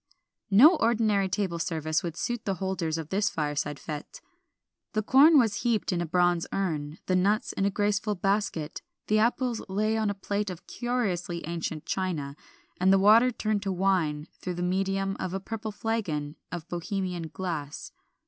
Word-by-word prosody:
No 280 - +7
ordinary 215 -5 +2
table 185 -3 -1
service 155 -1 -1
would 170 -1 -5
suit 240 -2 -2
the 195 -2 0
holders 185 -4 -2
of 160 -1 -6
this 200 +1 +1
fireside 150 -1 -2
fête. 150 +1 -7 0.7
The 215 -1 0
corn 290 +8 +7
was 225 -6 +3
heaped 235 -5 +1
in 175 -1 0
a 170 - -2
bronze 175 0 +2
urn, 155 -5 -2
the 185 - +1
nuts 200 +4 +1
in 195 - 0
a - - +3
graceful 205 +1 0
basket, 195 -5 -1 0.2
the 215 0 +2
apples 240 +1 +1
lay 215 +3 +1
on 220 -1 +1
a 205 - -2
plate 200 +1 -2
of 180 -1 -8
curiously 190 -9 -2
ancient 165 -2 -4
china, 160 -7 -2 0.4
and 185 +1 +4
the 195 - +6
water 215 +6 +6
turned 215 -3 -1
to 195 -1 -2
wine 175 -5 0
through 180 -1 -4
the 175 - -3
medium 195 +1 0
of 185 0 -3
a - - -1
purple 220 +2 -5
flagon 185 -10 -2 0.2
of 170 -1 -6
Bohemian 180 -1 -3
glass. 160 -5 -5
190 Hz, 170 wpm, -28 LUFS, 170-210 Hz, 0.7 s, No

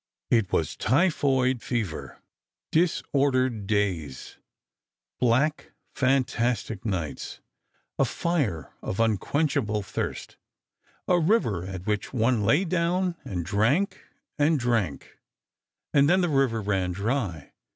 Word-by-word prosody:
It 115 -5 +3
was 80 - 0
typhoid 130 -3 +2
fever. 110 -11 -4 0.5
Disordered 135 - +1
days... 95 -10 -2 0.8
black, 130 +6 +1 0.2
fantastic 125 -5 0
nights, 90 -9 -4 0.6
a - - +5
fire 135 - -1
of 95 - -4
unquenchable 115 0 +1
thirst... - - -5 0.7
a 180 -1 +4
river 155 - +2
at 95 -1 -7
which 105 +2 -2
one 120 -1 +2
lay 115 - +3
down 180 +1 0
and 90 -4 -4
drank 120 - +1 0.4
and 150 +1 +3
drank... 115 - -1 0.7
and 140 0 +5
then 185 +2 +4
the 175 - +1
river 135 -6 +1
ran 95 -3 0
dry 100 - -2
120 Hz, 105 wpm, -26 LUFS, 100-145 Hz, 0.8 s, a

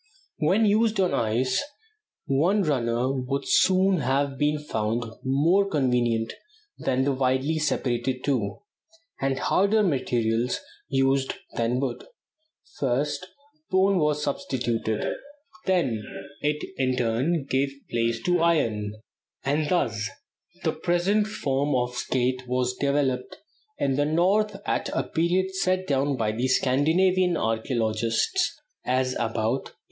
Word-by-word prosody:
When 220 +4 +3
used 215 0 +2
on 185 -2 +2
ice, 120 +4 +1 0.6
one 175 +10 +2
runner 125 -4 0
would 135 +1 -2
soon 190 0 +4
have 135 0 0
been 150 +2 +1
found 115 -5 -2 0.2
more 165 +10 +3
convenient 120 -7 +1 0.5
than 130 0 +1
the 140 - +2
widely 130 +4 +1
separated 130 -3 -1
two, 120 - -1 0.6
and 135 -1 0
harder 205 +3 +2
materials 120 - 0 0.3
used 135 0 +1 0.2
than 120 +2 0
wood: 135 -2 -3 0.8
first 145 +7 -1 0.4
bone 190 0 +3
was 150 -1 +1
substituted; 120 -6 -1 0.6
then 135 - +1 0.4
it, 150 0 -1
in 130 -1 +1
turn, 130 +7 0
gave 135 +1 +1 0.2
place 115 0 0
to 180 -1 +2
iron; 110 -11 +1 0.5
and 145 +2 +1
thus 110 - 0 0.5
the - - +1
present 195 +5 +1
form 140 -7 -1
of 125 0 0
skate 125 +1 -1
was 125 0 0
developed 140 -2 0 0.4
in 135 -1 0
the 145 - +2
North 195 +6 +2
at - - -1
a - - 0
period 180 +3 0
set 185 0 0
down 140 -2 +1
by 110 -2 -1
Scandinavian 160 +9 +2
archæologists 115 - 0 0.3
as 130 0 0
about 115 +2 -1
A. - - -23
135 Hz, 120 wpm, -26 LUFS, 125-170 Hz, 0.8 s, soon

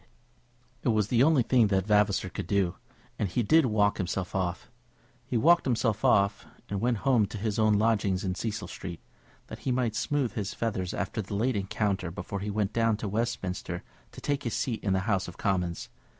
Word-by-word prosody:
It - - 0
was 110 -2 +2
the 120 -1 +3
only 145 -2 +5
thing 120 -2 +4
that 95 -2 +1
Vavasor 105 -3 +2
could - - -6
do, 95 -4 +1 0.5
and 100 - 0
he 120 +7 0
did 155 +5 +4
walk 105 -2 +2
himself 90 0 -2
off. 90 -1 -2 0.6
He 125 - 0
walked 170 +8 +5
himself 115 -3 0
off, 100 -5 +3 0.2
and 100 -1 -2
went 120 -1 +1
home 120 -6 +4
to 105 - -7
his 105 +1 -2
own 110 -1 +4
lodgings 100 -3 +1
in 95 -2 -1
Cecil 110 +3 -4
Street, 85 -2 -7 0.4
that - - -9
he 130 - -2
might 125 -3 0
smooth 130 +2 0
his 100 -4 -3
feathers 95 -6 -2
after 110 - -2
the 100 0 -6
late 120 +4 +1
encounter 100 -2 -1
before 90 +3 -5
he 105 +2 -4
went 105 0 -1
down 115 -2 +2
to 110 - -4
Westminster 100 -5 -3 0.3
to - - -10
take 145 -1 -1
his 120 - -3
seat 120 -4 -2
in 100 - +1
the 95 - +1
House 100 -2 0
of 90 - -10
Commons. 90 -3 -1
105 Hz, 200 wpm, -28 LUFS, 95-115 Hz, 0.6 s, only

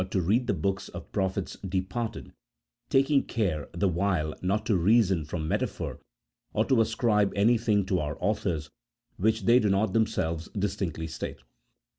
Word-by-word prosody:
15 95 - -4
to 85 - -2
read 120 +5 +2
the - - +2
books 95 +4 -2
of - - -9
prophets 95 -1 -2
departed, 95 +4 -4 0.6
taking 135 +1 +4
care 90 -10 -2
the 90 +4 0
while 85 -3 0
not 100 +4 0
to 110 - +2
reason 95 -2 +3
from 80 +1 -4
metaphor - - -2 0.5
or 110 +1 +2
to 130 -4 +3
ascribe 110 -2 +2
anything 105 -1 +3
to 95 -1 0
our 75 -1 -3
authors 90 -6 -1 0.5
which 110 +2 +1
they 120 +4 +6
do 105 - +1
not 100 0 +1
themselves 95 -8 0
distinctly 95 -5 -2
state. 80 - -5
100 Hz, 155 wpm, -28 LUFS, 90-110 Hz, 0.6 s, they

